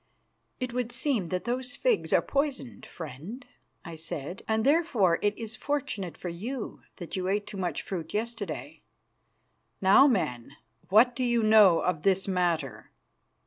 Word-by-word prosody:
"It 255 -1 -3
would 245 -1 -2
seem 245 - -1
that 180 +2 -2
those 250 +1 -2
figs - - +1
are - - +4
poisoned, 275 -3 -2
friend," 165 - -8 0.4
I 170 - -7
said, 165 +1 -6
"and 220 0 +1
therefore 265 - +3
it 205 0 0
is 225 0 -6
fortunate 205 - -3
for - - -6
you 220 +9 -5
that 175 -4 -7
you 185 -1 -2
ate 205 +2 0
too 200 - -8
much 180 -2 -2
fruit 165 -4 -5
yesterday. 230 +2 -4 1.0
Now, 195 +9 +7
man, 135 - -1 0.4
what 235 +5 +5
do 255 - -1
you 240 -2 +2
know 215 -5 +6
of 170 -4 -1
this 190 +1 +2
matter?" 175 -6 -1
205 Hz, 150 wpm, -28 LUFS, 175-245 Hz, 1.0 s, Now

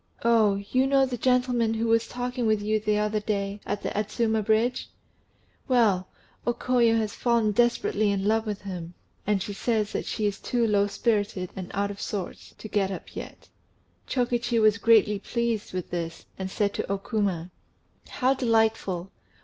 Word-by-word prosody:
"Oh, 220 -4 +4 0.2
you 260 +1 +3
know 270 0 +4
the 255 -1 -3
gentleman 245 -2 +2
who 225 +1 -1
was 230 0 +2
talking 245 -1 -2
with 215 -1 +3
you 215 +1 0
the 210 0 +1
other 210 0 0
day, 200 -1 -2
at 205 0 -3
the - - -1
Adzuma 220 +2 0
Bridge? 225 +4 +1 0.8
Well, 215 -8 +3 0.4
O 240 - +2
Koyo 235 -3 +3
has 215 -2 -1
fallen 235 -3 +2
desperately 215 -2 +2
in 195 -1 -1
love 220 +1 +1
with 210 -2 -3
him, 180 -3 -6 0.3
and 205 -2 +1
she 205 - -5
says 215 0 0
that - - -3
she 215 - -2
is 205 -1 -1
too 240 -2 0
low 205 -2 +3
spirited 205 -4 -1
and 185 -2 -6
out 200 0 0
of 200 - -9
sorts 195 -4 -5
to - - -8
get 205 -2 0
up 195 - -8
yet." - - -9 0.6
Chokichi 240 -2 0
was 215 0 +4
greatly 215 -3 +4
pleased 235 -1 -2
to - - -15
hear 180 - -1
this, 165 -2 -5
and 190 0 -4
said 200 +1 0
to - - -3
O 200 - +1
Kuma 195 -5 -2 0.6
"How 260 0 +2
delightful! 220 -7 +1
215 Hz, 180 wpm, -26 LUFS, 200-235 Hz, 0.8 s, Oh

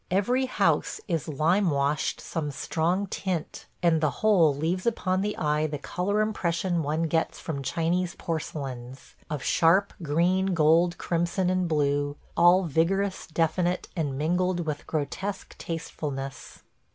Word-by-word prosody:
Every 245 +8 +1
house - - +1
is 165 -7 -1
lime 170 +6 +2
washed 140 0 0
some 155 -3 -3
strong 170 +7 -1
tint, 185 -4 -4 0.2
and 165 -2 +3
the 155 - +3 0.2
whole 180 -8 +6
leaves 165 +8 -2
upon 185 -5 +1
the 210 +1 -2
eye 150 0 +1
the 150 -1 -4
color 190 +8 -1
impression 175 -4 0
one 155 +2 -1
gets 160 0 0
from 145 -4 -4
Chinese 170 +5 -1
porcelains 135 -6 -5
– - - -31
of 150 -5 -3
sharp 185 +5 +3
green, 175 +5 +1
gold, 165 +2 +4
crimson, 175 +2 0
and 185 -1 +1
blue; 145 -2 +1 0.2
all 175 +2 +6
vigorous, 185 +5 0
definite, 175 +2 0
and 145 -6 -2
mingled 175 +4 +1
with 150 -2 -4
grotesque 190 +6 -4
tastefulness. 140 -4 -6
165 Hz, 140 wpm, -27 LUFS, 150-185 Hz, 0.2 s, whole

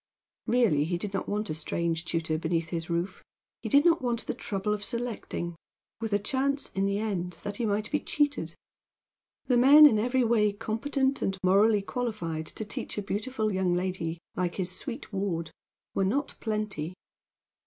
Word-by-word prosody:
Really, 230 -13 +3
he 175 +2 -1
did 200 +3 -5
not 195 - -2
want 210 -3 -1
a - - 0
strange 165 +1 -1
tutor 160 -2 -1
beneath 165 0 -1
his 165 -1 -4
roof; 170 +3 -2 0.4
he - - -4
did 285 +2 +5
not 340 -1 +5
want 240 -2 -1
the - - -2
trouble 210 -1 -2
of 205 -1 -3
selecting, 225 -7 -3 0.4
with 225 -1 -3
a 205 - +4
chance, 275 +6 -1
in 195 +1 0
the 200 0 0
end, 190 -5 -2
that 205 0 -4
he 235 - 0
might 210 +1 -1
be 295 - +2
cheated. 290 -1 0 0.9
The 245 -2 +3
men 290 +4 +9
in 225 -8 +6
every 250 +3 +2
way 220 -3 +3
competent 265 +6 -1
and 190 0 0
morally 200 +3 +4
qualified 195 -10 -3
to 220 - -5
teach 210 - -5
a 205 - -1
beautiful 215 +2 -1
young 185 -2 +1
lady, 175 -2 -2 0.2
like 180 -1 -1
his 185 -2 -1
sweet 245 -2 -7
ward, 180 -5 -2 0.4
were 195 - +1
not 270 +10 0
plenty. 210 -7 -3
205 Hz, 175 wpm, -28 LUFS, 180-235 Hz, 0.9 s, men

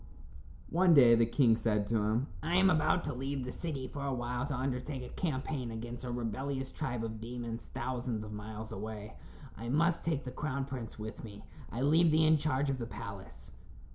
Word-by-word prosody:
One 175 0 +6
day 125 -4 +8
the 115 0 +5
king 115 -1 +4
said 105 -2 +1
to 115 +2 +1
him: 110 +4 +1 0.2
"I 170 +3 0
am 185 0 +6
about 160 +1 +3
to 145 - -2
leave 135 +1 -3
the 125 - -4
city 140 -5 -4
for 140 +2 -6
a 140 - 0
while 120 +2 -2
to 145 - -2
undertake 130 +1 -2
a 125 - -7
campaign 135 -5 -2
against 120 +2 -6
a - - -4
rebellious 130 +3 -2
tribe 120 -7 -3
of 110 -1 -5
demons 115 0 -5
thousands 120 -3 -3
of 105 0 -7
miles 110 +1 -6
away. 105 +1 -6 0.4
I 115 +3 -6
must 165 +5 +2
take 160 -3 0
the 125 - -5
crown 140 0 -2
prince 125 -4 -6
with 110 +1 -6
me. 105 -2 -9 0.3
I 120 +4 -2
leave 160 +4 +5
thee 155 +1 +4
in 155 0 +6
charge 145 -2 +1
of 135 - -2
the 115 - -3
palace." 100 -5 -8
125 Hz, 200 wpm, -33 LUFS, 115-145 Hz, 0.4 s, day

